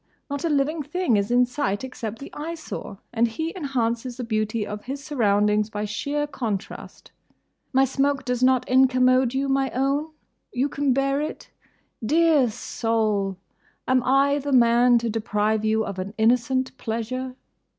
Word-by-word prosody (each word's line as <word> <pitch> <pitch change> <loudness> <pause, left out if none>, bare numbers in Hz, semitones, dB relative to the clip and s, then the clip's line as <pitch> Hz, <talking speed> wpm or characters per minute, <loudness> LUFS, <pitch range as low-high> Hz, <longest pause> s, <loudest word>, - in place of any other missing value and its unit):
Not 285 0 -3
a 335 - +1
living 300 +2 +1
thing 355 -4 0
is 200 0 0
in 245 +1 +4
sight 240 -5 -2
except 230 -4 -6
the 275 - -10
Eyesore; 315 -9 -6 0.2
and 235 0 +3
he 320 +9 -4
enhances 250 -6 -2
the 250 - -4
beauty 215 -1 -1
of 210 0 -7
his 275 +2 -5
surroundings 210 -6 +2
by 210 -1 -3
sheer 285 +8 -2
contrast. 230 -9 -6 0.6
My 265 0 +4
smoke 275 +1 0
does 250 -1 -1
not 255 -1 +3
incommode 255 -1 +4
you, 275 +1 0
my 270 0 +1
own?—You 280 0 -3
can 285 -1 0
bear 275 +2 +1
it?—Dear 305 -1 -1
soul! 215 -4 -1 0.5
Am 255 0 +3
I 275 +2 +3
the 285 0 -4
man 240 0 +5
to 235 0 -1
deprive 215 -1 0
you 220 0 +1
of 195 -2 -5
an 195 +3 -5
innocent 250 +3 +1
pleasure? 250 +3 -4
250 Hz, 150 wpm, -24 LUFS, 220-275 Hz, 0.6 s, man